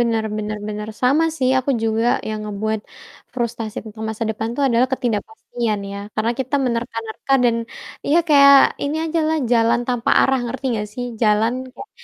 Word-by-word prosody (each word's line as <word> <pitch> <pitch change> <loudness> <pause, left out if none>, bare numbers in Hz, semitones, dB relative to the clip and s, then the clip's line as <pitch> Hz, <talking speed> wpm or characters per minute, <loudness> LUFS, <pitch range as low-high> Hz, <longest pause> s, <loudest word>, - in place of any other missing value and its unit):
Bener 230 -2 +1
bener 215 0 -4
bener, 210 0 -5
sama 280 +6 +4
sih, 255 -1 +2
aku 260 +2 -1
juga 225 +1 +1 0.2
yang 215 0 -3
ngebuat 215 +1 -2 0.5
frustrasi 235 -3 -3
tentang 220 0 -9
masa 220 +1 -3
depan 220 +1 -3
tuh 285 - 0
adalah 240 0 +3
ketidakpastian, 230 -2 -2
ya. 200 - -5 0.2
Karena 225 +2 0
kita 260 +2 -3
menerka-nerka 230 0 -3
dan, 235 -1 +3 0.5
iya, 315 +4 +4
kayak 280 -1 +8 0.3
ini 290 +2 -1
aja 325 0 0
lah, 320 - +1
jalan 230 0 +3
tanpa 245 -2 0
arah, 265 0 +3
ngerti 260 +3 -6
nggak 210 -1 -2
sih, 245 +1 -4 0.2
jalan, 215 +1 +3 0.2
kayak 415 - -10
230 Hz, 170 wpm, -20 LUFS, 220-255 Hz, 0.5 s, kayak